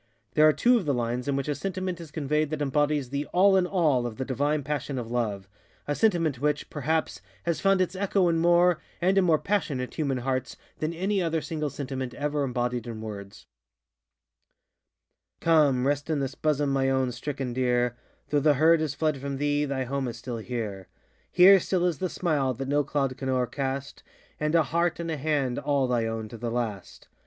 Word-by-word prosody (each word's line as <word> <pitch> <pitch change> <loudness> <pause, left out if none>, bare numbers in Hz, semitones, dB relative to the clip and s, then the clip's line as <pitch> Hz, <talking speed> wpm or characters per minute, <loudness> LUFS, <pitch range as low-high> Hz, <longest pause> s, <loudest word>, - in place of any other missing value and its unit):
There 155 0 +6
are - - +7
two 245 +10 +3
of 205 - -3
the 140 - +2
lines 120 +2 -2
in 140 - +1
which 140 0 -2
a 150 - +1
sentiment 185 +2 -4
is 165 - -9
conveyed 150 +1 -1
that 155 -1 -3
embodies 145 -1 0
the 140 +1 -2
_all 195 +2 +6
in 185 -1 +3
all 155 -10 +2
_of 115 -2 -5
the 130 - -3
divine 145 +3 0
passion 140 -1 -3
of 120 -2 -4
LoveŌĆöa 110 -5 -2 0.5
sentiment 165 - +1
which, 150 0 -1
perhaps, 155 -8 -1 0.2
has 170 - -1
found 195 -1 +3
its 185 0 -1
echo 195 -1 +1
in 165 -1 +2
more, 175 0 +4 0.2
and 185 +2 +2
in - - +3
more 165 -3 +4
passionate, 150 -10 -2
human 140 -5 -1
hearts 130 +1 -2 0.2
than 155 +1 -1
any 190 +4 -1
other 165 -2 0
single 155 0 -3
sentiment 130 -2 -5
ever 145 0 -1
embodied 125 -2 -2
in 115 -2 -6
words:ŌĆö 100 -3 -8 1.9
Come, 145 -6 +3
rest 145 +2 0
in 155 - +1
this 135 -1 -2
bosom, 145 -2 0
my 135 -1 +1
own 130 -1 +1
stricken 130 0 -4
deer 125 -1 +1 0.4
Though 145 - +3
the 145 +1 +4
herd 160 +3 +4
have 150 -3 -2
fled 155 -2 0
from 140 0 -4
thee, 145 +1 +1
thy 135 -2 -2
home 135 +1 -2
is 115 -1 -5
still 120 0 -5
here; 110 -5 -5 0.4
Here 190 +2 +8
still 180 0 0
is 170 -5 0
the 185 - -1
smile, 145 -9 0
that 135 +3 -5
no 145 +1 +2
cloud 135 -2 -1
can 135 - -4
oŌĆÖercast, 135 +2 -2 0.4
And 150 +2 0
a 165 - +5
heart 170 +4 0
and 170 -1 -3
a 155 - -2
hand 140 -4 0
all 140 -2 +1
thy 120 -2 0
own 115 -1 -4
to 115 - -9
the 120 +1 -3
last. 115 -5 -4
145 Hz, 200 wpm, -27 LUFS, 125-160 Hz, 1.9 s, Here